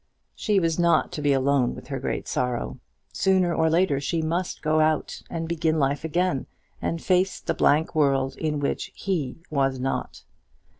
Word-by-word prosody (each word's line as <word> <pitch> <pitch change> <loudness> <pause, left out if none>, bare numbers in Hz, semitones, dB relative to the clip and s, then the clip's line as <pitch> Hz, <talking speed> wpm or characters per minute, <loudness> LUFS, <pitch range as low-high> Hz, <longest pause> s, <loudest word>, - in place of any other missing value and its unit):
She 210 -3 +1
was 165 -1 0
not 170 -1 +3
to 150 - -5
be 145 -1 +2
alone 135 -2 +2
with - - -11
her 135 -2 -3
great 130 - -3
sorrow. 120 - -2 0.3
Sooner 185 -2 +2
or 160 -1 +2
later 165 -4 +2
she 160 +3 -1
must 170 +3 -2
go 155 0 +2
out 155 -1 +1
and 165 -1 -3
begin 160 -1 0
life 140 +1 +1
again, 165 -3 0 0.3
and 165 - -1
face 185 +2 +1
the - - -2
blank 155 +3 +2
world 135 -3 +2
in 150 -2 -1
which 140 - -2
he 165 -10 -2
was 135 -3 +1
not. 135 +1 -3
155 Hz, 170 wpm, -25 LUFS, 135-170 Hz, 0.3 s, not